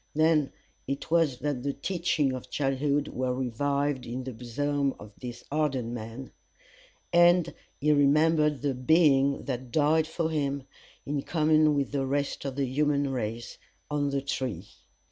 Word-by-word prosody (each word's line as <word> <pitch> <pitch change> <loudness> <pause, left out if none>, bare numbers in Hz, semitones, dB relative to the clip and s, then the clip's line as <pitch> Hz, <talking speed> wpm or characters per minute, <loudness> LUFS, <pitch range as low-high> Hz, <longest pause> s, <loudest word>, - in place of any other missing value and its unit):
Then 155 -2 +3 0.4
it 140 +3 -4
was 165 -6 +3
that 145 -4 -2
the 140 +2 -2
teachings 155 -3 0
of 130 - -7
childhood 140 +1 0
were 130 -1 -2
revived 140 +2 -1
in 125 +2 -4
the 130 0 -6
bosom 140 +4 -1
of 105 0 -11
this 120 -1 -7
hardened 135 -6 -1
man, 115 +3 -7 0.8
and 175 0 +5 0.3
he 150 +2 +2
remembered 150 0 +3
the 140 -2 +1
Being 140 0 +3
that 125 -2 -4
died 155 +3 +3
for 160 0 -2
him, 140 -3 -1 0.4
in 145 0 -2
common 155 -1 +3
with 140 -1 -1
the 135 -2 -1
rest 140 +1 -2
of 135 -2 -3
the 140 0 0
human 140 +1 +1
race, 115 -2 -4 0.3
on 145 -1 0
the 140 -1 -2
tree. 125 -9 -3
140 Hz, 150 wpm, -28 LUFS, 130-150 Hz, 0.8 s, and